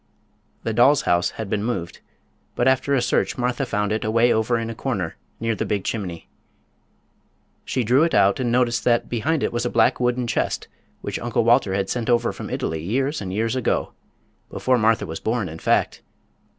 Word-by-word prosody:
The 115 - -2
doll's 125 +5 +4
house 85 +2 +2
had 110 - -4
been 100 +1 -1
moved, 95 -8 -3 0.6
but 120 - +1
after 130 +2 +2
a 125 - +1
search 120 - 0
Martha 125 +1 -1
found 105 -2 -1
it 110 0 -1
away 115 +2 +3
over 110 +2 +1
in 115 0 -3
a - - -5
corner 105 -9 -3 0.2
near 115 0 0
the - - -2
big 100 -2 -2
chimney. 90 -7 -4 1.4
She 130 - -1
drew 125 +6 +3
it 165 +1 +2
out 100 +4 +4
and 120 -2 0
noticed 120 -1 +1
that 120 -1 +2
behind 140 +6 0
it - - -1
was 120 0 -1
a 120 - 0
black 115 -1 +3
wooden 125 0 0
chest 120 - -1 0.3
which - - -4
Uncle 120 -1 0
Walter 115 -4 +3
had 100 -1 -1
sent 120 +1 -2
over 120 -1 +2
from - - -7
Italy 80 -1 -3
years 130 - -1
and 95 -2 -5
years 115 +5 -1
ago—before 130 0 -3
Martha 110 +1 +2
was 80 0 -6
born, 110 -3 -1
in 80 0 -8
fact. - - +1
115 Hz, 190 wpm, -22 LUFS, 105-125 Hz, 1.4 s, doll's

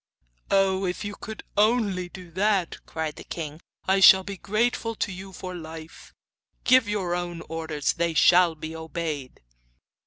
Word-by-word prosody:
'Oh, 195 -1 +3
if 180 +3 -3
you 205 - -4
can 220 0 -8
only 205 -4 +2
do 180 -2 -11
that,' 190 -1 0
cried 160 -1 -4
the - - -8
king, 155 -1 -6 0.3
'I 190 +1 +4
shall 190 0 +8
be 200 +1 -6
grateful 225 +3 -1
to 205 - -2
you 190 +1 -8
for 185 0 -7
life! 160 -1 -10 0.5
Give 255 -4 +5
your 190 -4 -1
own 175 -1 -3
orders; 160 -3 -2
they 170 -1 -1
shall 175 +2 +5
be 160 +1 -7
obeyed. 160 - -5
180 Hz, 155 wpm, -26 LUFS, 165-195 Hz, 0.5 s, shall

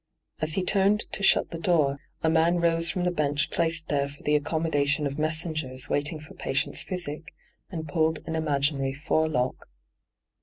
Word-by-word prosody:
As 155 0 +1
he 190 - 0
turned 200 +2 +3
to - - -5
shut 195 - +4
the 165 - -5
door, 150 -6 +2 0.2
a 160 - +3
man 165 +2 +3
rose 165 0 +2
from 180 - -1
the 180 - +2
bench 150 -3 0
placed 165 -1 -1
there 140 -1 +1
for 145 - -14
the 150 - +1
accommo 160 +2 0
dation 145 +1 +2
of 140 +1 -3
messengers 155 -4 -1
waiting 145 +2 -1
for 155 - -12
patients* 145 +2 +1
physic, 165 -4 -4 0.3
and 160 -4 -5
pulled 160 +1 0
an 160 - -2
imaginary 140 -3 0
forelock. 145 - -1
155 Hz, 175 wpm, -27 LUFS, 145-165 Hz, 0.3 s, shut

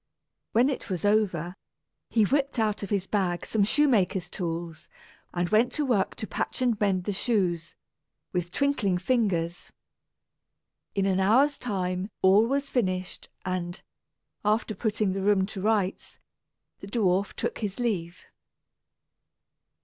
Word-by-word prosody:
When 240 +4 +5
it 275 -5 -3
was 185 -1 -2
over, 190 -5 +1 0.5
he 225 - +3
whipped 275 +4 0
out 215 -2 +1
of 200 - -5
his 200 -3 0
bag 185 -4 -1
some 215 -2 +1
shoemaker's 200 - +2
tools, 170 -3 -4 0.4
and 175 0 -1
went 225 +4 +3
to 300 - 0
work 230 -7 +1
to 220 - -5
patch 215 +1 -3
and 235 -4 +1
mend 190 -3 +2
the 205 - -2
shoes, 185 -6 0 0.6
with 175 -1 -2
twinkling 230 -8 +1
fingers. 180 -5 0 1.2
In 195 -1 +1
an 190 -1 +2
hour's 260 +9 +4
time 185 -4 -2
all 200 +4 +6
was 280 +2 0
finished 185 -6 -2 0.2
and, 180 -1 -3 0.6
after 215 +1 +1
putting 215 -1 0
the 195 - -2
room 195 -1 +3
to 195 -1 -7
rights, 205 -2 0 0.6
the 195 - -9
dwarf 200 -2 +1
took - - -3
his 205 0 -4
leave. 185 -8 -2
200 Hz, 135 wpm, -27 LUFS, 185-225 Hz, 1.2 s, all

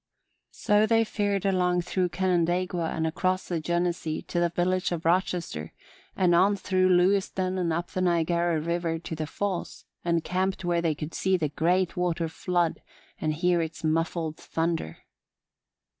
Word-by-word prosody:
So 210 0 +2
they 225 0 +4
fared 205 -3 -1
along 180 -2 +2
through 180 0 0
Canandaigua 175 -1 0
and 160 - -2
across 185 +3 -1
the 170 -2 -1
Genesee 170 -1 -1
to 175 - -2
the 175 0 +2
village 180 +2 0
of 170 -2 -3
Rochester 170 - 0 0.4
and 180 -2 +3
on 190 +4 +4
through 185 -1 +1
Lewiston 185 0 +2
and 170 -2 0
up 170 +2 -2
the 185 - -2
Niagara 170 -1 +1
River 170 +1 -1
to 165 0 -6
the 155 -1 -4
Falls, 195 +2 -4 0.2
and 170 -1 +1
camped 190 0 -1
where 170 -1 +1
they 165 -3 0
could 150 +2 -6
see 190 0 +1
the 155 -4 -1
great 175 +5 +1
water 175 -2 0
flood 175 0 -1 0.4
and 155 -1 -1
hear 175 +2 +2
its 160 0 -5
muffled 160 0 -1
thunder. 165 - -3
175 Hz, 160 wpm, -27 LUFS, 165-185 Hz, 0.4 s, they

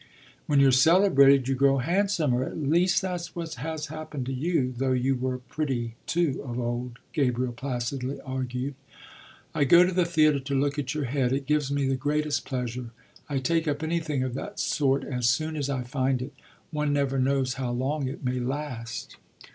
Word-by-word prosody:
"When 145 -2 +3
you're 135 -1 +6
celebrated 140 -3 +5
you 135 - +1
grow 135 +1 +3
handsomer; 160 -4 +1
at - - -5
least 170 +6 +2
that's 175 -2 -4
what 165 -2 -4
has 150 +4 -4
happened 155 -3 -6
to 135 - -3
you, 130 -2 0
though 130 +1 0
you 130 +1 +1
were 130 0 -2
pretty 125 -2 -3
too 170 -5 0
of 125 -2 -4
old," 120 0 -3 0.2
Gabriel 125 -4 0
placidly 130 +1 -3
argued. 130 0 -3 0.8
"I 145 - +2
go 170 +6 +7
to 185 - 0
the 180 -1 +2
theatre 155 -4 +3
to 135 0 -1
look 145 +1 0
at 135 0 -3
your 150 - -1
head; 130 -1 0
it 135 +1 -1
gives 150 -1 +1
me 140 -1 +1
the 135 - +1
greatest 145 +1 -1
pleasure. 125 -2 -4 0.4
I 140 - -1
take 165 +5 0
up 145 +1 -1
anything 160 -4 -1
of 130 -2 -3
that 200 +10 -6
sort 140 -2 +1
as 125 -3 0
soon 155 +6 0
as 145 -2 -2
I 130 -2 -1
find 130 +1 0
it. 130 +3 -6 0.4
One 150 -1 0
never 140 -1 +1
knows 130 -1 +1
how 130 -2 -3
long 130 +4 -1
it 135 +1 -6
may 125 0 0
last." 125 -3 -5
135 Hz, 185 wpm, -27 LUFS, 130-150 Hz, 0.8 s, go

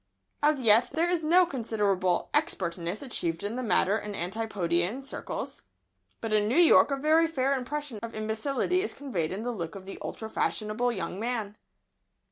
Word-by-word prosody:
As 295 -2 +3
yet, 225 0 +5
there 325 +4 +1
is 350 -2 0
no 350 +4 +5
considerable 205 - 0
expertness 185 - 0
achieved 170 -10 -2
in 205 +3 -3
the 255 - -2
matter 210 -1 +2
in 210 -1 -6
Antipodean 190 +2 -1
circles, 275 - -6 0.6
but 225 -1 -2
in 210 -1 +3
New 240 - +1
York 345 -3 +7
a 275 - 0
very 315 +4 +4
fair 275 -4 0
impression 275 -2 -4
of 230 0 -7
imbecility 230 +11 0
is 415 - -3
conveyed 210 - -3
in 200 +4 -4
the 245 - -2
look 170 -7 -5
of 190 -1 -9
the 195 - -8
ultra 220 - -5
fashionable 220 +2 0
young 190 -3 -4
man. 225 -3 -3
225 Hz, 170 wpm, -28 LUFS, 200-275 Hz, 0.6 s, York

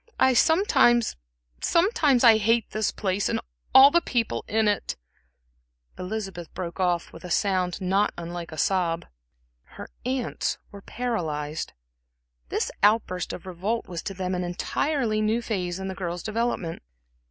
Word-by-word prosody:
I 260 - +6
I - - +4
s 290 - +4 0.5
sometimes 335 - +3
I 230 -3 +8
hate 225 +2 +1
this 215 0 0
place, 195 -1 -1
and - - 0 0.3
all 270 +2 +9
the 345 - +4
people 235 -7 -1
in 220 0 +2
it," 205 -2 0 1.0
Elizabeth 185 -3 -5
broke 175 0 -5
off, 175 -2 0
with 165 - -12
a 180 - -7
sound 185 -1 +1
not 195 +3 +1
unlike 170 0 -6
a 155 - -8
sob. 170 -1 +1 0.7
Her - - -7 0.2
aunts 255 -1 -2
were 200 - -10
paralyzed. 160 -12 -3 0.8
This - - -1
outburst 205 -4 +2
of 185 - -8
revolt 190 +6 -3
was 175 -2 -5
to 195 - -6
them 185 0 -2
an 180 0 -1
entirely 215 - -1
new 215 +2 +1
phase 185 -6 -3
in 190 0 -5
the 190 - -3
girl's 175 -2 -4
development. 220 -6 -2
200 Hz, 150 wpm, -26 LUFS, 180-235 Hz, 1.0 s, all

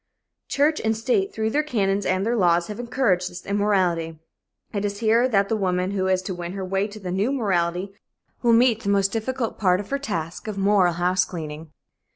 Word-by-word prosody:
Church 300 +2 +1
and 220 0 +1
state, 265 - 0
through 220 0 -2
their 295 - +2
canons 205 -9 0
and 185 +2 +1
their 235 +2 +1
laws, 175 -4 +3
have 210 +2 -6
encouraged 235 -7 0
this 175 -1 -10
immorality. 185 -5 0 0.6
It 200 -1 -2
is 200 0 -2
here 230 +3 +3
that 200 -4 +2
the 225 - 0
woman 185 -2 0
who 190 -2 -1
is 185 0 +1
to 185 - -4
win 175 0 -6
her 195 -1 -4
way 195 +2 0
to 215 0 -10
the 185 -3 -5
new 200 +7 0
morality 190 -6 -1 0.5
will 235 -1 +4
meet 230 -1 +4
the 200 - -2
most 200 -1 +2
difficult 230 +2 -3
part 185 -3 +3
of 205 - -8
her 280 - 0
task 165 - -4
of 210 -2 -4
moral 195 -3 +3
house 180 +2 +2
cleaning. 155 -2 -7
200 Hz, 205 wpm, -23 LUFS, 180-225 Hz, 0.6 s, will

